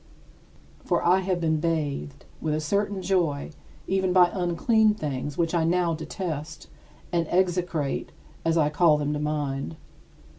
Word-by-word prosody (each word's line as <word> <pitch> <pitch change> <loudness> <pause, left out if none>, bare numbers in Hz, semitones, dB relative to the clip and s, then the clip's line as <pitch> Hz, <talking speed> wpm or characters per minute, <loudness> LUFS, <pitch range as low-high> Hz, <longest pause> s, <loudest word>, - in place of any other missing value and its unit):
For - - 0
I 180 +2 +5
have 185 -1 -1
been 160 -2 +1
bathed 145 -4 -2 0.2
with 155 -1 0
a - - 0
certain 200 +4 -1
joy 170 -6 0 0.3
even 190 -1 +1
by 180 -1 +6
unclean 210 +5 +2
things, 145 -5 -4
which 165 0 0
I 170 -2 +2
now 170 0 +2
detest 160 -1 -5 0.5
and 170 -2 0
execrate 175 -5 0 0.3
as 165 0 +2
I 150 -2 +3
call 155 0 +4
them 150 0 -1
to 150 - -2
mind. 145 - -2
165 Hz, 145 wpm, -26 LUFS, 150-180 Hz, 0.5 s, by